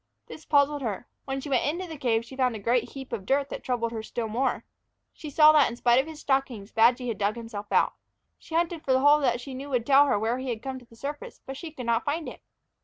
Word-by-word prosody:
This 315 - -11
puzzled 285 0 +3
her; 220 -3 -3 0.2
when 270 0 -3
she 290 - -7
went 260 -3 +2
into 345 +6 -2
the 320 - -7
cave 235 -5 0
she 265 - -11
found 255 -3 +1
a - - -5
great 235 +3 +1
heap 265 -3 -8
of 215 -4 -3
dirt 275 +6 +1
that - - -6
troubled 235 -2 -1
her 225 -1 -4
still 225 +1 -4
more. 245 +4 -1 0.5
She 305 - -8
saw 305 +2 +7
that 300 -2 +5
in 235 - -6
spite 240 0 +4
of 280 - -10
his 315 -2 -9
stockings, 265 -7 -1
Badgy 240 +3 +3
had 225 -4 -3
dug 205 +2 +1
himself 225 -3 -7
out. - - +3 0.5
She 325 - -8
hunted 335 -1 0
for 265 - +1
the 260 - +3
hole 290 +2 +6
that 245 -4 +1
she 265 +2 -8
knew 270 +2 -7
would 250 -4 0
tell 280 +2 +6
her 270 - +2
where 225 +4 -1
he 260 0 -4
had 230 -1 -4
come 265 -1 -5
through 245 - -18
to - - -42
the 230 - -17
surface 285 +5 -6
again, - - -42
but 270 0 -7
she 320 +3 -7
could 260 -5 -8
not 235 0 +1
find 310 +3 -2
it. - - -9
260 Hz, 280 wpm, -27 LUFS, 235-285 Hz, 0.5 s, saw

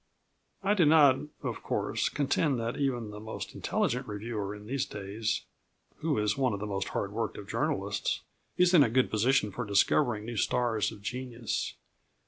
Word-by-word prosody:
I 200 +1 +3
do 195 -4 +4
not, 145 -4 +6 0.2
of - - -3
course, - - -1
contend 140 -1 +1
that 115 +2 -2
even 120 -6 -1
the 105 - -8
most 110 +1 -6
intelligent 125 +2 -1
reviewer 105 -1 -4
in 105 0 -11
these 135 +4 -1
days, 105 +2 -3 0.5
(who 155 -2 0
is 105 -1 +1
one 130 -4 +1
of 100 - -3
the 105 - -3
most 95 -2 -2
hard - - -2
worked - - -2
of - - -8
journalists), - - -1 0.4
is 180 0 +4
in 170 - +8
a 130 - +5
good 130 +3 +2
position 110 0 +2
for 120 - -4
discovering 105 +2 +2
new 120 -1 -5
stars 115 -4 +1
of 100 - -12
genius. 125 -1 -3
120 Hz, 175 wpm, -30 LUFS, 105-135 Hz, 0.5 s, in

